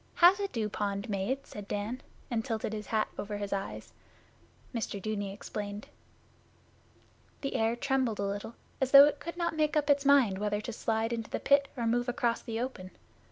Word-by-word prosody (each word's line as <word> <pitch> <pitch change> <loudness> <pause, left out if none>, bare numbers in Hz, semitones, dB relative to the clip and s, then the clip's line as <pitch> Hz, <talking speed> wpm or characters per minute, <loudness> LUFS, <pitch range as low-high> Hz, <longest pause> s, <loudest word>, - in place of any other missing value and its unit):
'How's 360 +3 +7
a 400 - 0
dew 225 - -2
pond 205 +1 -3
made?' 205 +8 -1
said 205 -1 -9
Dan, 210 +6 -3 0.3
and 225 -2 0
tilted 220 -3 -2
his 210 -1 -5
hat 220 -1 +1
over 205 0 -3
his 205 -1 -3
eyes. 195 0 -5 0.8
Mr 220 -3 -3
Dudeney 205 -1 -3
explained. 205 0 -6 1.5
The 275 - -3
air 225 +1 +1
trembled 260 -3 0
a 200 - -2
little 200 +3 -4 0.3
as 265 - +2
though 275 +1 +11
it 295 - 0
could 335 +2 -7
not 340 -2 -1
make 305 0 +1
up 295 -1 +3
its 280 0 +3
mind 270 -9 +4
whether 205 0 0
to 220 +2 -5
slide 225 +1 -1
into 225 -2 -4
the - - -2
Pit 280 0 +4
or 235 - -1
move 245 +2 +1
across 240 -1 0
the 225 -1 -4
open. 235 -7 -4
225 Hz, 190 wpm, -30 LUFS, 205-270 Hz, 1.5 s, though